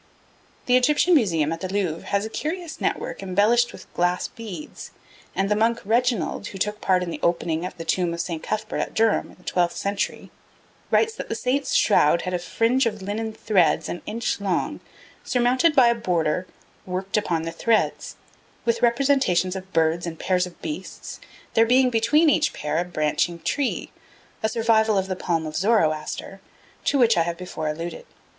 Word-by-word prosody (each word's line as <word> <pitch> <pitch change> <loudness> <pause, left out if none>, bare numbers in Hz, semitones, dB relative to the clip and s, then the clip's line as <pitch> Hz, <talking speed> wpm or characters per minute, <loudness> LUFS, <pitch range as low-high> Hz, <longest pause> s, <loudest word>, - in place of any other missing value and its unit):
The 250 - +4
Egyptian 300 +7 +3
Museum 165 - +2
at 165 - -6
the 185 - -3
Louvre 185 -5 -2
has 200 +1 0
a - - -5
curious 330 +4 -4
network - - -2
embellished 210 +6 +2
with - - -14
glass 175 +1 0
beads; 230 +6 -9 0.5
and 195 - +1
the 210 - +2
monk 230 +2 +2
Reginald, 235 -1 0
who 195 - -8
took 210 +2 -2
part 185 -1 +2
in 170 -2 -5
opening 170 0 0
the 165 - -7
tomb 175 +1 +1
of 170 - -5
St. 170 -2 -3
Cuthbert 215 0 -3
at - - -3
Durham 225 -1 +2
in - - -16
the 180 - -23
twelfth 175 -1 0
century, 200 0 -3 0.6
writes 450 0 +3
that 455 - -7
the - - -2
Saint's 270 +3 -1
shroud 170 -5 +4
had 185 - -3
a 180 - 0
fringe 230 +8 +1
of 210 -3 -4
linen 220 +3 -3
threads 195 -5 +2
an 175 - -5
inch 225 0 -2
long, 190 -3 -1 0.4
surmounted 255 +6 +2
by 250 -3 +7
a - - +4
border, 180 -5 -1 0.4
'worked 185 +1 -3
upon 170 -6 0
the 165 - -4
threads,' 220 +6 0 0.5
with 235 -1 +1
representations 235 -8 +2
of 190 0 -8
birds 165 +1 +1
and 165 -1 -5
pairs 180 +1 +1
of 175 - -15
beasts, 305 -1 -6 0.3
there 225 - +5
being 250 +2 +4
between 240 +8 +3
each 295 - +4
such - - -10
pair 150 +2 -2
a - - +1
branching 170 0 0
tree, 270 - -2 0.5
a 220 - +1
survival 220 -2 +2
of 190 - +1
the 190 -1 -3
palm 165 -3 -1
of 155 0 -6
Zoroaster, 185 -2 0 0.4
to 285 - +2
which 230 -6 +4
I - - +4
have 170 +1 -2
before 180 -3 -5
alluded. 165 +2 -5
200 Hz, 180 wpm, -24 LUFS, 175-235 Hz, 0.6 s, by